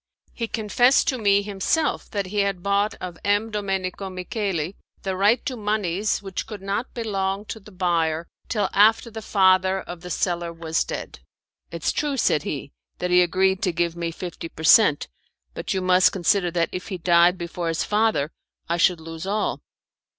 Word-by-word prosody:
He 230 - -3
confessed 245 +6 +3
to 260 -3 -1
me 200 -1 +3
himself 205 - -1
that 200 -3 -2
he 205 +3 -3
had 195 -3 0
bought 200 +1 +1
of 180 -2 -7
M. 205 +2 +1
Domenico 195 -2 -3
Micheli 185 -2 -3 0.3
the 190 -1 -2
right 205 +6 +3
to 260 - -2
moneys 210 -2 -1
which 195 -2 -5
could 210 -3 -8
not 200 +5 -3
belong 200 -3 -2
to 220 - -6
the 210 +1 -15
buyer 170 -3 0 0.2
till 210 -5 +1
after 220 +3 +4
the 220 0 -7
father 190 -2 +3
of 175 -1 -9
the 180 - -8
seller 175 -2 -1
was 165 -1 -1
dead. - - -6 0.5
"It's - - -1
true," 290 -2 -1
said 155 - +2
he, 140 -1 -5 0.3
"that 180 0 -2
he 180 0 +6
agreed 190 +2 +2
to 180 - +1
give 170 0 -1
me 170 -1 -3
fifty 165 0 -7
per 160 - -10
cent., 160 -3 +6 0.5
but - - -5
you 190 - 0
must 185 0 +5
consider 185 0 +1
that 170 -1 0
if 180 -1 -6
he 185 - -4
died 175 +1 +4
before 170 0 -4
his 165 0 0
father 210 -8 +1 0.4
I 170 - 0
should 175 -1 +3
lose 165 +2 -7
all." 210 +2 -1
190 Hz, 180 wpm, -24 LUFS, 175-205 Hz, 0.5 s, he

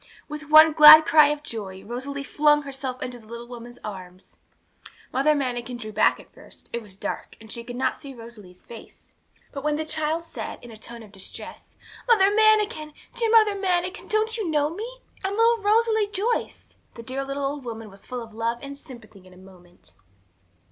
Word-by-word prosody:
With 300 0 -8
one 310 0 +8
glad 310 0 +10
cry 305 -2 +6
of 295 0 -2
joy, 195 -7 -7
Rosalie 275 +4 -5
flung 295 +1 +2
herself 270 -2 -5
into 250 -1 -6
the 220 - -19
little 235 +1 -9
woman's 240 0 -10
arms. 185 -2 -10 0.8
Mother 285 +4 +3
Manikin 245 -3 -3
drew 215 -3 -7
back 215 - +2
at - - -17
first; - - -14
it 235 - -2
was 205 -4 -14
dark, - - -6
and 220 -1 -14
she 235 - -7
could 245 +1 -8
not 255 - -1
see 275 -2 -10
Rosalie's 215 -6 -13
face. 230 -2 -14 0.4
But 275 -2 -7
when 300 0 0
the 315 +1 -3
child 315 +1 -2
said, 335 - -7
in 240 - -11
a - - -11
tone 230 +1 -10
of 210 - -15
distress, 195 -2 -9 0.3
'Mother 405 -5 +5
Manikin, 425 -8 +2 0.2
dear 465 -2 -1
Mother 435 -2 +5
Manikin, 370 0 -1
don't 440 +1 +1
you 415 -7 -3
know 295 -1 +1
me? 480 +6 -8 0.2
I'm 390 +1 -2
little 460 +1 +3
Rosalie 440 0 +2
Joyce,' 415 +4 -3 0.2
the 230 - -9
dear 260 +4 -4
little 275 +1 -4
old 280 0 -4
woman 225 -3 -8
was 195 - -15
full 250 -2 -6
of 225 -1 -14
love 230 +1 -2
and 280 0 -7
sympathy 220 -8 -14
in 185 - -17
a - - -18
moment. 180 -2 -18
275 Hz, 195 wpm, -24 LUFS, 230-330 Hz, 0.8 s, glad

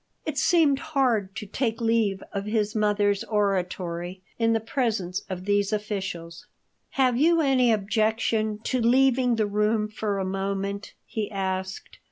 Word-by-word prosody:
It 300 -3 -2
seemed 300 -4 +4
hard 255 -11 0
to 225 -2 -5
take 225 +2 -2
leave 225 -4 +1
of 200 0 -3
his 210 -1 0
mother's 205 -1 +2
oratory 185 -3 -2 0.2
in 230 0 +3
the 225 - +2
presence 220 -6 -1
of 185 -1 -5
these 205 0 +1
officials. 190 -6 -4 0.5
"Have 255 -3 +3
you 330 +5 +4
any 265 -5 +3
objection 215 +1 +1
to 255 - 0
leaving 250 0 +3
the 220 -1 +1
room 210 +1 +1
for 210 -1 -3
a 190 - -1
moment?" 195 +1 -3
he 215 -2 -3
asked. 190 -1 -4
210 Hz, 145 wpm, -26 LUFS, 195-235 Hz, 0.5 s, seemed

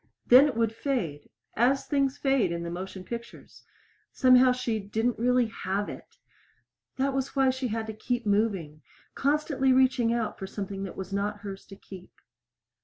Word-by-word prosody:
Then 260 +4 +8
it 275 - -3
would 225 -1 +1
fade, 210 - -3 0.3
as 260 +4 +2
things 275 -1 0
fade 270 -10 +1
in 170 0 -3
the 170 - -5
motion 185 +1 -6
pictures. 235 +4 -9 0.5
Somehow 255 -1 +5
she 250 -3 -2
didn't 220 +4 -2
really 250 +1 +3
have 205 -2 -3
it. - - -11 0.8
That 270 +1 0
was 270 +1 -3
why 270 -1 +4
she 260 0 -3
had 225 0 -3
to 220 - -6
keep 240 +3 -3
coming 200 -8 0 0.3
constantly 280 -2 +1
reaching 255 -2 +3
out 235 -2 -2
for 190 - -5
something 195 0 -6
that 190 - -9
was 190 0 -6
not 205 +1 -2
hers 195 -1 -8
to 195 - -11
keep. 190 -2 -13
230 Hz, 170 wpm, -27 LUFS, 195-260 Hz, 0.8 s, Then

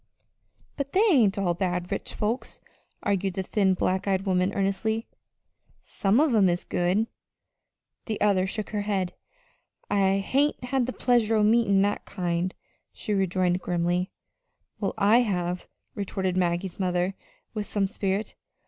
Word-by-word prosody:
"But 280 -1 -4
they 395 - +4
ain't 220 - +4
all 185 -3 +1
bad 180 0 -2
rich 200 - -4
folks," 220 +4 -2 0.4
argued 195 -2 0
the 190 - -1
thin, 190 -1 +2
black 185 +2 0
eyed 195 0 +1
woman, 185 0 +2
earnestly. 200 +3 0 0.8
"Some 200 +4 +1
of 300 -4 +3
'em 200 -4 +5
is 175 0 -1
good." 180 +5 +1 1.0
The 215 - -2
other 195 -3 +3
shook 210 +2 -5
her 210 -1 -1
head. 195 -3 -1 0.8
"I 195 -1 +3
hain't 275 +8 +1
had 250 0 0
the - - -1
pleasure 235 -3 +2
o' 215 - +3
meetin' 210 -3 +4
that 205 +1 -1
kind," 180 -1 -2 0.4
she 210 - -4
rejoined 185 -2 +1
grimly. 175 +1 0 0.7
"Well, - - -2
I 210 +3 +5
have," 180 -6 -1 0.3
retorted 190 -2 -2
Maggie's 175 +1 -1
mother 180 0 0 0.4
with 210 -2 -3
some 205 -2 0
spirit. 195 +1 -2
195 Hz, 145 wpm, -26 LUFS, 185-215 Hz, 1.0 s, em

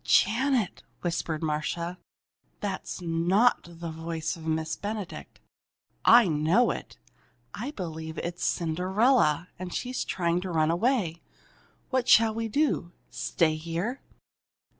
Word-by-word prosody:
"Janet," 235 -1 +2 0.2
whispered 170 -2 -2
Marcia, 170 +3 -2 0.6
"that's 195 -2 -4
not 175 +8 +3
the 170 -1 -7
voice 160 +1 -3
of 160 -1 -9
Miss 160 0 -1
Benedict! 205 -2 -6 0.6
I 235 -2 +8
know 160 +9 +3
it! - - -7 0.6
I - - -4
believe 160 - -6
it's 175 0 -4
Cinderella, 180 - +2
and 185 -1 -5
she's 250 +5 -2
trying 170 -1 0
to 185 - -5
run 160 -2 +2
away! 175 -4 +1 0.7
What 260 -2 +1
shall 225 -1 +6
we 225 +1 -2
do 220 - 0 0.2
stay 160 -3 +1
here?" 170 - -3
175 Hz, 120 wpm, -28 LUFS, 165-220 Hz, 0.7 s, I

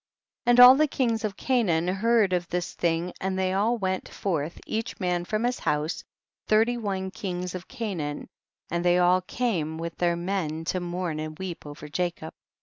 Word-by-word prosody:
43. 240 - +5
And 240 - +5
all 250 +1 +11
the 305 +2 +3
kings 230 -5 0
of 205 -2 -3
Canaan 190 -11 +1
heard 205 +1 +2
of 175 -1 0
this 175 0 -3
thing 170 +1 -1
and 190 0 -1
they 190 0 0
all 220 +5 +2
went 190 -3 -2
forth, 165 -4 -3
each 225 +3 -3
man 180 -2 0
from 215 +4 -1
his 245 +1 0
house, 150 +2 -1 0.4
thirty 225 +3 +3
one 195 -5 -3
kings 180 -2 -4
of 185 -1 -7
Canaan, 190 - -4 0.4
and 170 +1 -1
they 175 0 +4
all 180 +1 +4
came 180 -7 -2
with 165 +1 -5
their 175 -1 +2
men 170 -3 -2
to 185 - -1
mourn 175 -2 -3
and 155 0 -5
weep 180 -5 -6
over 145 +1 -9
Jacob. 170 0 -3
185 Hz, 185 wpm, -26 LUFS, 170-215 Hz, 0.4 s, all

